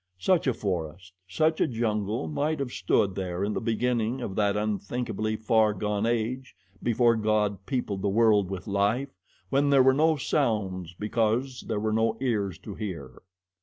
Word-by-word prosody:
Such 170 - +2
a 130 - +3
forest, 90 -1 -4
such 155 - +1
a - - +4
jungle 110 -5 -1
might 150 - -1
have 135 -3 -3
stood 95 0 +1
there 90 -1 -3
in 105 +1 -1
the - - -2
beginning 120 +1 0
of 100 -6 -5
that 105 -1 +1
unthinkably 110 +1 -2
far 110 -1 +2
gone 105 +2 -1
age 120 +3 -2 0.3
before 120 0 +3
God 105 -3 0
peopled 115 -8 -2
the 100 - +1
world 105 -2 +3
with 95 -2 -5
life, 105 +7 0 0.4
when 140 +1 +3
there 135 -2 +6
were 130 0 +5
no 155 +3 +3
sounds 100 - -1
because 115 +4 0
there 110 -3 -1
were 110 0 -1
no 110 0 +1
ears 105 -9 -1
to 100 +2 -9
hear. 85 - -7
110 Hz, 165 wpm, -27 LUFS, 100-125 Hz, 0.4 s, there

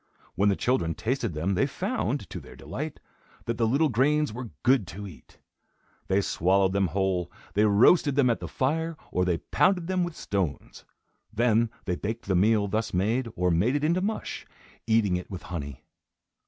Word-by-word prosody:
When 100 +1 +2
the 100 - +2
children 90 -11 0
tasted 120 - -2
them, 85 +6 0
they 90 - +2
found, - - -2
to - - -5
their - - -13
delight, - - -6 0.5
that 115 +1 -3
the 115 - +3
little 145 +7 +2
grains 145 +3 +2
were 125 0 -6
good 125 -6 +3
to 100 +6 -7
eat. 90 -7 -13 0.7
They 95 +1 +2
swallowed 95 +1 +2
them 100 -1 +2
whole, 90 0 -1 0.2
they 105 +2 +3
roasted 130 - +5
them 140 -2 +4
at 115 - +1
the - - -6
fire, 160 +4 -1
or 90 - +1
they 90 -2 +1
pounded 175 - +1
them 185 0 0
with 175 -2 -4
stones. 90 -8 -3 0.5
Then 115 0 +2 0.2
they 90 - -1
baked 110 +3 -4
the 95 - 0
meal 105 +2 +3
thus 110 0 -2
made 115 +7 +1
or 90 0 +1
made 100 - +2
it 145 - 0
into 170 +4 +2
mush, 215 +3 -4 0.4
eating 110 -5 +3
it 90 - -8
with 95 -3 -7
honey. 70 -5 -6
110 Hz, 180 wpm, -27 LUFS, 95-130 Hz, 0.7 s, roasted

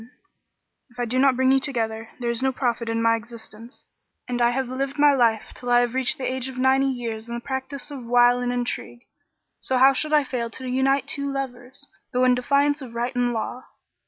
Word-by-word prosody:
[FN#37] 225 - -15 0.8
If 245 0 -16
I 245 - 0
do 250 +2 -1
not 270 -1 +4
bring 260 +1 +3
you 270 - +4
together, 225 -4 -2
there 240 -1 -1
is 235 +1 -2
no 265 0 +2
profit 240 -3 -2
in 230 0 -1
my 230 0 +4
existence; 230 +1 -11 0.4
and 245 -1 -2
I 235 - +5
have 260 +1 -1
lived 270 +3 -3
my 290 0 +5
life 230 -4 +1
till 245 - -7
I 240 0 +5
have 245 -1 -1
reached 260 -1 +1
the 265 - -7
age 260 0 -2
of 260 - -9
ninety 265 +1 +3
years 235 -3 -4
in 235 - -4
the - - -3
practice 265 +2 -6
of 275 -3 -7
wile 245 0 +5
and 245 0 -1
intrigue; 245 -1 -4 0.6
so 260 - -1
how 265 +2 +6
should 305 +3 -1
I 300 -1 +4
fail 245 -3 -3
to 260 +3 -8
unite 265 +2 +1
two 280 -1 -3
lovers, 265 0 -6 0.3
though 250 +1 +2
in 255 0 +5
defiance 280 +4 +1
of 240 -3 -9
right 240 +2 -2
and 245 0 +1
law?" 240 +2 -4
250 Hz, 225 wpm, -24 LUFS, 240-265 Hz, 0.8 s, how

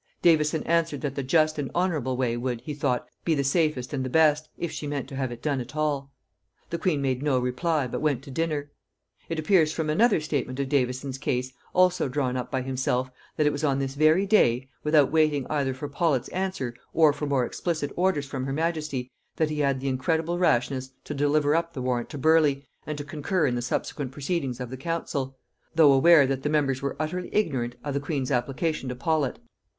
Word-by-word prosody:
Davison 160 -2 +3
answered, 165 -4 +1
that 145 -2 -2
the 140 - -3
just 155 +3 +2
and 140 - -2
honorable 155 -8 0
way 125 -2 0
would, 120 -1 -3
he 150 +4 -5
thought, 140 -4 -1 0.2
be 165 - +2
the 140 - 0
safest 140 -3 0
and 135 -2 -1
the 130 - -3
best, 155 +1 +3
if 170 - -3
she 150 - -5
meant 145 -2 -3
to 135 - -7
have 130 -2 -2
it 120 - -9
done 140 -4 0
at 120 +3 -9
all. 145 -3 -1 0.6
The 170 - -2
queen 155 -6 0
made 130 -1 0
no 145 -3 +2
reply, 130 +4 0
but 125 - -4
went 145 -4 0
to 140 - -10
dinner. 150 -1 -2 0.6
It 165 - -2
appears 155 -1 +3
from 155 -1 -1
another 220 +5 +4
statement 145 -4 -3
of 135 -1 -1
Davison's 130 0 -1
case, 130 -2 -2 0.2
also 180 -5 +3
drawn 130 -2 -1
up 125 -1 -3
by 130 -1 -1
himself, 130 -1 -1 0.3
that 155 - +2
it 150 - +4
was 145 +1 -4
on 140 -3 +2
this 135 -1 -2
very 155 +6 +4
day, 130 - +3 0.2
without 150 -2 +4
waiting 155 -4 +2
either 140 -3 +1
for 130 +3 -5
Paulet's 145 -3 0
answer 185 -10 -3 0.2
or 155 -3 +6
for 145 +1 -4
more 135 -3 +2
explicit 155 0 -3
orders 175 -5 +1
from 135 -1 -4
her 135 - -2
majesty, 155 -5 -2 0.2
that 155 -1 0
he 150 - -3
had 140 -2 +1
the 135 - -4
incredible 160 +6 0
rashness 130 -5 +1
to - - -5
deliver 145 +1 +2
up 170 0 -1
the 130 - -5
warrant 125 -2 -1
to 145 - -7
Burleigh, 150 -1 +3 0.3
and 150 -1 -3
to 145 - -4
concur 150 +3 -1
in 125 - +1
the 120 - -1
subsequent 130 +2 -3
proceedings 140 -3 -2
of 125 -1 -5
the 130 - -5
council; 140 -3 -3 0.4
though 155 -3 +7
aware 150 +2 +7
that 135 0 -1
the 150 - -1
members 140 -3 +1
were 140 -1 -2
utterly 180 +4 -3
ignorant 130 - 0
of 145 - -3
the 140 - 0
queen's 140 -2 -2
application 135 +3 -1
to 125 - -4
Paulet. 150 -1 0
145 Hz, 215 wpm, -26 LUFS, 130-155 Hz, 0.6 s, though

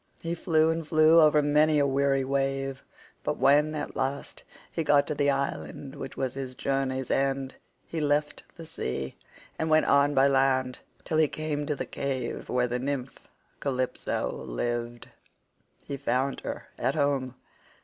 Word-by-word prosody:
He 165 0 -2
flew 160 -2 +2
and 165 -1 -3
flew 155 +1 +6
over 150 -1 +5
many 150 +1 +4
a 145 - +4
weary 135 0 +2
wave, 135 0 -1 0.4
but - - -1
when 150 +3 +4
at 150 - -5
last 135 +2 -3 0.3
he 165 - -2
got 145 -2 +4
to - - -2
the 145 -1 +1
island 135 - -3
which 135 - -8
was 130 -2 -1
his 130 -2 -6
journey's 130 -1 -1
end, 135 -1 0 0.3
he 165 - -4
left 150 0 0
the 165 - -9
sea 65 - -4 0.4
and 160 - 0
went 155 0 +4
on 140 +1 +4
by 135 +1 +5
land 130 -2 +2 0.2
till 155 - 0
he 155 - +5
came 150 -1 -3
to 150 - 0
the - - -4
cave 130 -3 -4
where 125 0 +2
the 125 0 -2
nymph 135 0 -3 0.4
Calypso 130 -2 -2
lived. 120 - -4 0.8
He 140 - -4
found 135 0 0
her - - -6
at 135 - 0
home. 140 -4 0
140 Hz, 160 wpm, -27 LUFS, 130-150 Hz, 0.8 s, flew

